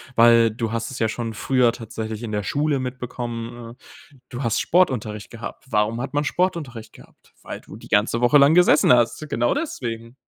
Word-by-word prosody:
weil 115 0 +6
du 115 0 -4
hast 115 +2 -3
es 130 - -7
ja 110 -1 +1
schon 115 0 -4
früher 120 +1 +2
tatsächlich 110 -1 -6
in 110 - -5
der 105 -1 -2
Schule 145 +1 0
mitbekommen. 120 -2 -6
Äh, 135 +3 -19
du 125 +2 -6
hast 115 - 0
Sportunterricht 120 - 0
gehabt. 115 -1 -9
Warum 105 +2 +1
hat 135 +3 -5
man 145 +1 +1
Sportunterricht 150 -10 -2
gehabt? - - -20
Weil - - -8
du - - -13
die - - -14
ganze 110 +3 +1
Woche 120 +4 +5
lang 140 +3 +6
gesessen 175 -7 +5
hast. 120 +5 +1
Genau 120 +1 +1
deswegen. 115 - -5
120 Hz, 185 wpm, -22 LUFS, 115-135 Hz, -, weil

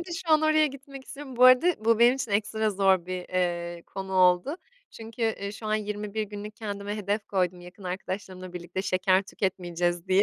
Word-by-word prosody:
nerede 345 +1 -8
şu 340 -1 -4
an? 310 0 +5
Oraya 310 0 +4
gitmek 275 -1 -10
istiyorum. 275 -3 -9
Bu 250 - +6
arada 255 0 +5
bu 230 -1 +4
benim 240 +2 +6
için 255 -4 -4
ekstra 215 +1 +1
zor 190 -3 +2
bir, 185 -1 -5
eee, 175 -1 -2
konu 190 0 -7
oldu 185 - +3 0.3
çünkü, 225 +1 -8
eee, 210 -3 -1
şu 215 +1 -8
an 215 - +1
21 210 0 -3
günlük 210 +1 -7
kendime 205 -2 -5
hedef 205 0 -2
koydum 180 -2 -1
yakın 180 +3 -13
arkadaşlarımla 185 0 -5
birlikte, 175 +1 -5
"Şeker 185 0 +2
tüketmeyeceğiz." 175 -3 -2
diye. 190 +1 +5
205 Hz, 190 wpm, -27 LUFS, 185-230 Hz, 0.3 s, Bu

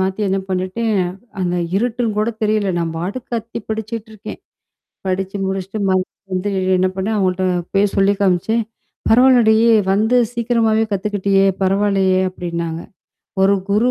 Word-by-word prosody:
மாத்தி 190 +2 -1
என்னா 195 0 0
பண்ணீட்டேன 185 +5 -1 0.5
அந்த 180 -1 0 0.2
இருட்டுன்னு 230 0 -1
கூட 215 +2 +1
தெரியல! 215 -1 +1
நான் 165 -1 -2
பாட்டுக்கு 195 +9 -5
கத்தி 230 0 -4
படிச்சுட்டுருக்கேன். 220 -1 -6 0.7
படிச்சு 190 +1 -2
முடிச்சுட்டு 195 +2 -3
மறுபடி 185 +1 -2
வந்து 185 +2 -1 0.3
என்னா 185 +1 +2
பண்ணேன்! 205 +4 -1
அவுங்கள்ட்ட 185 -1 0 0.3
போய் 200 0 +2
சொல்லி 195 +1 +3
காமிச்சேன். 195 +4 +1 0.5
"பரவால்லடி 240 -2 +5 0.4
வந்து 220 +5 +2 0.2
சீக்கிரமாவே 230 -2 +1
கத்துக்கிட்டியே! 200 -1 +1 0.2
பரவால்லையே!" 195 -1 +2
அப்டின்னாங்க. 170 -2 -4 0.6
ஒரு 195 +1 +4
குரு 220 +5 +3
200 Hz, 125 wpm, -18 LUFS, 185-220 Hz, 0.7 s, பரவால்லடி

